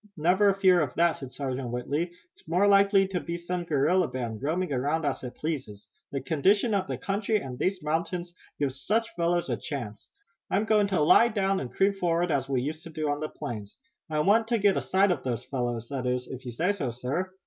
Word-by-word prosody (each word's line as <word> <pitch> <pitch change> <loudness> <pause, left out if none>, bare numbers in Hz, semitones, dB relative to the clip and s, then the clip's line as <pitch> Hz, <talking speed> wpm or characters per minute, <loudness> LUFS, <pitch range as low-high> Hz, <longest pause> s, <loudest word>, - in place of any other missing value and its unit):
"Never 185 +6 +4
a 195 - +2
fear 185 -3 +5
of 145 -4 -2
that," 170 0 +3
said 135 -2 -8
Sergeant 130 -1 -4
Whitley. 145 +8 -2 0.2
"It's - - -22
more 180 +5 +3
likely 200 -1 +5
to 185 -2 -1
be 170 0 -4
some 175 +1 -3
guerrilla 170 +4 +2
band, 120 -3 -5
roaming 160 +3 -1
around 145 +5 0
as 145 - -2
it 125 0 -6
pleases. 130 -10 -5 0.3
The 140 - -2
condition 195 - +2
of 190 -2 0
the - - -3
country 205 +2 0
and 130 -9 -6
these 185 +1 -1
mountains 170 +3 -2 0.2
give 140 -3 -1
such 215 - -1
fellows 170 0 0
a - - 0
chance. 120 -10 -6 0.4
I'm 205 +3 +1
going 210 -2 +3
to 190 -5 +1
lie 195 +10 +6
down 195 -3 0
and 125 - -5
creep 195 +1 +2
forward 175 -1 +1
as 135 -2 0
we 130 -2 0
used 155 +3 -4
to - - -8
do 155 -2 -2
on 145 - -2
the 155 0 -3
plains. 105 -4 -7 0.3
I 155 -1 +1
want 220 +6 +3
to 235 0 +2
get 205 -2 +3
a - - 0
sight 195 +1 +3
of 175 - -1
those 120 -3 -3
fellows, 120 -3 -3
that 130 -3 -3
is, 125 0 -1
if 130 0 -8
you - - -3
say 170 - +1
so, 170 -11 -2
sir." 130 +10 -3
160 Hz, 225 wpm, -27 LUFS, 130-190 Hz, 0.4 s, lie